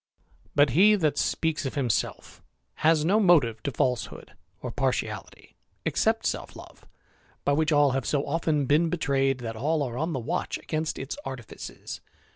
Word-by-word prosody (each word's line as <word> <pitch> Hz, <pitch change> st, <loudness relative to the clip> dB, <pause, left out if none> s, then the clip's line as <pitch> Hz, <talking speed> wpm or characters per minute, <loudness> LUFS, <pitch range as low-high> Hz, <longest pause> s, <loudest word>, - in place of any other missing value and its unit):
But 145 Hz, -2 st, +5 dB
he 200 Hz, -, +6 dB
that 155 Hz, -7 st, +1 dB
speaks 160 Hz, -2 st, 0 dB
of 135 Hz, -, -6 dB
himself 125 Hz, -6 st, -2 dB, 0.4 s
has 155 Hz, -1 st, +4 dB
no 200 Hz, +6 st, +4 dB
motive 145 Hz, -, +4 dB
to 140 Hz, -, -2 dB
falsehood 125 Hz, -1 st, -2 dB, 0.3 s
Or -, -, -5 dB
partiality -, -, -3 dB, 0.3 s
except -, -, +1 dB
self -, -, -3 dB
love, -, -, -14 dB, 0.6 s
by 145 Hz, -, +3 dB
which 155 Hz, +2 st, +1 dB
all 145 Hz, -2 st, +5 dB
have 135 Hz, +1 st, -2 dB
so 145 Hz, -1 st, 0 dB
often 155 Hz, -1 st, 0 dB
been 155 Hz, +5 st, +3 dB
betrayed 135 Hz, -5 st, 0 dB
that 115 Hz, -1 st, -5 dB
all 150 Hz, +6 st, 0 dB
are 125 Hz, -2 st, -4 dB
on 160 Hz, +2 st, -1 dB
the 135 Hz, -, -1 dB
watch 115 Hz, -, -2 dB
against 155 Hz, 0 st, -3 dB
its 135 Hz, -, -5 dB
artifices. 130 Hz, -4 st, -8 dB
145 Hz, 160 wpm, -27 LUFS, 130-160 Hz, 0.6 s, he